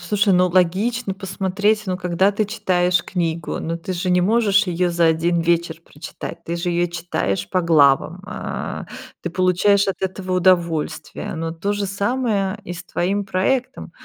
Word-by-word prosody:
слушай, 200 +3 +1
ну, 180 0 +4
логично 195 +5 +1
посмотреть, 200 +2 -1
ну, 185 - -1
когда 180 +2 +1
ты 215 +2 0
читаешь 180 -3 +1
книгу, 170 -3 -2
ну, 165 +1 -3
ты 185 +3 -5
же 180 +1 -2
не 180 - +4
можешь 200 0 +3
её 180 0 0
за 170 -1 +2
1 170 +2 +2
вечер 170 0 0
прочитать, 150 +2 -9
ты 170 - -3
же 175 +1 -2
её 175 0 +1
читаешь 165 - -2
по 185 - +1
главам, 155 +1 +3
а, - - -5 0.4
ты 175 - -3
получаешь 185 +3 +3
от 195 - -3
этого 190 0 -3
удовольствие. 175 -5 0
Но 165 0 -3
то 200 +5 -2
же 205 -1 -2
самое 205 -1 -1
и - - -7
с 180 +1 -9
твоим 195 +4 -1
проектом. 240 +7 -1
180 Hz, 165 wpm, -21 LUFS, 170-200 Hz, 0.4 s, ну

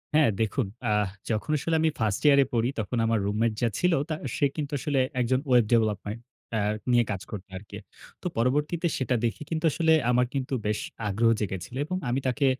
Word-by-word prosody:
হ্যাঁ 150 -5 +5
দেখুন, 110 +3 0 0.2
আ - - +3 0.4
যখন 110 +6 -1
আসলে 165 +3 -1
আমি 160 - +4
ফার্স্ট 110 -3 0
ইয়ার 145 -1 +7
এ - - -5
পড়ি 115 +1 +2
তখন 110 +3 -2
আমার 115 -1 +2
রুমমেট 110 +2 +1
যা 120 - +3
ছিল 180 -1 +3 0.2
তা 155 - 0 0.2
সে - - +3
কিন্তু 150 -1 -3
আসলে 140 0 0 0.2
একজন 130 +1 +2
ওয়েব 120 -3 +5
ডেভেলপমেন্ট 110 -1 +1 0.4
আ - - +1 0.3
নিয়ে 120 -1 +5
কাজ 95 -3 -3
করতো 100 -2 -7
আরকি। 100 +1 -10 0.4
তো - - -2
পরবর্তীতে 150 +8 +1
সেটা 130 -1 0
দেখে 115 - -2
কিন্তু 160 0 -1
আসলে 160 +1 +3 0.2
আমার 125 0 +3
কিন্তু 135 0 -2
বেশ 105 0 0 0.3
আগ্রহ 110 +3 +2
জেগেছিলো 95 +2 -4
এবং 185 +3 -2
আমি 125 +3 +1
তাকে 140 +3 +1
120 Hz, 195 wpm, -27 LUFS, 110-145 Hz, 0.4 s, ইয়ার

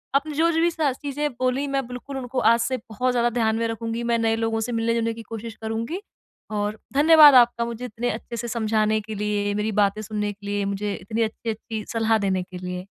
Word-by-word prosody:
अपने 295 +2 +1
जो 330 +2 +3
जो 325 0 +1
भी 345 - +4
सा 310 -4 +1
चीज़ें 290 +2 -3
बोली 255 +2 +1
मैं 275 -2 -1
बिल्कुल 250 +2 -7
उनको 255 0 -3
आज 230 - +3
से 255 +3 0
बहुत 250 +2 -2
ज़्यादा 240 -1 +2
ध्यान 225 -2 +1
में 230 0 0
रखूँगी, 230 +1 -3
मैं 235 0 +1
नए 225 0 +2
लोगों 225 0 -1
से 235 +2 -2
मिलने-जुलने 230 0 0
की 230 - -9
कोशिश 225 +1 -7
करूँगी 230 - -3 0.5
और 210 0 -2
धन्यवाद 300 -1 +8
आपका 240 -1 +5
मुझे 235 +1 -5
इतने 240 +1 -3
अच्छे 235 +2 -5
से 240 +1 -4
समझाने 220 -1 +1
के 215 +1 -7
लिए, 205 0 -1
मेरी 210 +1 -1
बातें 200 +2 0
सुनने 210 0 -2
के 205 0 -16
लिए, 205 0 -1
मुझे 200 +1 -2
इतनी 220 +5 -3
अच्छी-अच्छी 220 0 -4
सलाह 225 -1 +2
देने 190 -3 0
के 180 0 -10
लिए। 180 +1 -5
225 Hz, 215 wpm, -24 LUFS, 215-250 Hz, 0.5 s, धन्यवाद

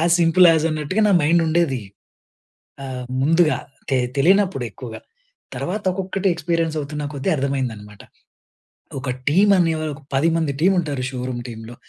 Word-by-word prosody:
As 170 +1 +3
simple 170 +2 +6
as 160 -1 +1
అన్నట్టుగా 155 +7 -1
నా 200 - +4
mind 165 +3 +3
ఉండేది. 160 -6 +1 1.0
ఆహ్, 130 -2 -5 0.2
ముందుగా 165 +2 +3 0.3
తె 135 - +2 0.2
తెలియనప్పుడు 185 -4 +3
ఎక్కువగా. 115 +2 -9 0.6
తర్వాత 205 +4 -3
ఒక్కొక్కటి 195 +1 -2
ఎక్స్పీరియన్స్ 165 -1 -1
అవుతున్న 150 +1 -5
కొద్దీ 135 -1 -1
అర్థమైందన్నమాట. 120 -7 -4 1.0
ఒక 130 - -6 0.2
టీమ్ 195 +8 +4
అనే 165 -2 +3 0.2
ఒక 140 - -13
10 140 +5 +3
మంది 160 -3 0
టీమ్ 190 +3 +4
ఉంటారు, 145 -5 -4
షోరూం 125 -1 -4
టీంలో. 115 +1 -9
155 Hz, 140 wpm, -21 LUFS, 130-170 Hz, 1.0 s, simple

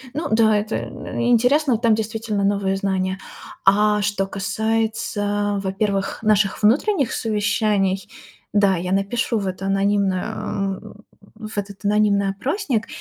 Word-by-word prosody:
Ну 310 - -2
да, 220 -1 +4
это 215 +2 -2
и 235 - -4
интересно, 250 +2 +3
там 225 -1 +3
действительно 220 -1 -2
новые 195 -1 +1
знания. 190 -1 -1 0.5
А 210 +1 +4
что 200 -1 0
касается, 205 0 -1
во-первых, 195 +1 -1
наших 215 -1 +2
внутренних 275 - +2
совещаний, 205 -3 0 0.5
да, 200 -2 +4
я 180 +2 -3
напишу 200 +4 0
в 195 - -3
это 185 +1 -4
анонимный 195 -1 +1
о 195 -3 -3 0.6
в 215 -1 -9
этот 200 0 -5
анонимный 205 -1 +2
опросник. 245 - -2
205 Hz, 125 wpm, -21 LUFS, 195-220 Hz, 0.6 s, да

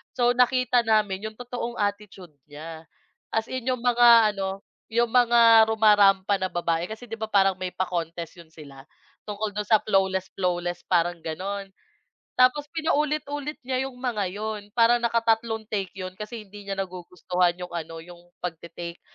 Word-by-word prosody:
So, 245 -1 +3
nakita 250 -1 +2
namin 210 -2 +1
yung 220 - -10
totoong 245 0 -5
attitude 205 -4 -4 0.2
niya, 160 +2 -10 0.5
as 225 +1 -1
in 255 -1 -4
yung 255 -2 0
mga 235 -3 +6
ano, 195 0 -4 0.3
yung 235 +1 +2
mga 235 -2 +6
rumarampa 205 -3 +4
na 190 -1 -3
babae 170 -1 -1
kasi 220 +3 -8
'di 225 - -5
ba 220 - -7
parang 195 -2 +4
may 185 -1 -5
pa-contest 170 -2 -4
'yon 170 -2 -15
sila 140 -4 -13 0.4
tungkol 210 0 -5
do'n 210 - -1
sa 215 +1 +4
flawless 190 -2 0
flawless, 175 -1 -2
parang 175 -1 +1
gano'n. 195 +4 -5 0.7
Tapos 255 +4 +3
pinaulit-ulit 300 -2 -2
niya 260 +1 -1
yung 260 - -14
mga 240 -6 -2
'yon 210 +1 -5
parang 235 +1 +4
nakatatlong 230 -1 0
take 195 -3 -1
'yon 185 -1 -6
kasi 215 +1 -7
hindi 205 0 -13
niya 195 - -3
nagugustuhan 180 -1 -1
yung 180 -1 -8
ano, 165 -1 -5
yung 175 0 -13 0.2
pagte-take 170 0 -7
205 Hz, 155 wpm, -25 LUFS, 180-235 Hz, 0.7 s, mga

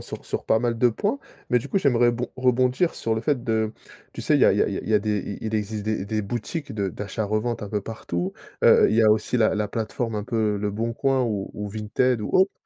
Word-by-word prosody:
sur - - -8
sur - - -4
pas 110 - +3
mal 120 0 0
de 125 - +5
points. 205 - -1 0.3
Mais 125 - +4
du 120 - -7
coup, 195 - +1
j'aimerais 120 -6 +3
bon 120 +1 -3
rebondir 130 +5 +2
sur 115 -1 -1
le 110 - -2
fait 135 -3 0
de 110 -2 0 0.4
tu - - -7
sais, - - +2
il - - +4
y - - +6
a - - +6
il - - 0
y - - +5
a - - +2
il - - -4
y 110 - +2
a 105 - +6
des 105 0 -1 0.2
il - - -5
il 110 - -3
existe 105 0 -2
des 110 -3 -1
des 110 0 -1
boutiques 120 - -4
de 100 -2 -1
d'achat-revente 110 +3 -2
un 105 - -5
peu 105 0 -1
partout. 95 -4 -4 0.3
Heu, - - +7
il 110 - +1
y 115 - +5
a 110 - +6
aussi 110 +3 +1
la 110 -3 +3
la 105 -1 -1
plateforme 115 +1 -3
un 105 - -3
peu, 110 -3 0
Leboncoin 115 +6 0
ou 105 -5 -2
ou 105 0 -4
Vinted 110 +3 0
ou 105 - -4
autre. 190 +1 +4
110 Hz, 260 wpm, -24 LUFS, 105-120 Hz, 0.4 s, Heu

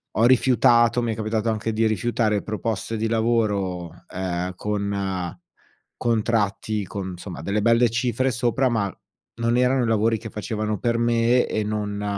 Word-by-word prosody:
ho 115 - +4
rifiutato 120 -1 +4
mi 115 -2 -1
è - - -6
capitato 110 +1 -1
anche 110 0 -1
di 110 +1 +2
rifiutare 110 -1 0
proposte 110 +1 -3
di 110 +1 0
lavoro, 105 -7 0 0.2
ehm, 90 0 -3
con 100 -3 -3 0.6
contratti 110 -2 0
con, 95 0 -5
insomma, 90 -3 -8
delle 100 +5 -1
belle 115 +2 +4
cifre 120 +2 0
sopra, 120 +2 +1
ma 100 -5 -1 0.4
non 115 +1 0
erano 125 0 +3
i - - -1
lavori 115 0 +2
che 110 +1 -8
facevano 105 0 -3
per 115 -1 0
me 120 +1 +3
e 110 - -1
non 105 -1 -3
110 Hz, 155 wpm, -23 LUFS, 100-115 Hz, 0.6 s, ho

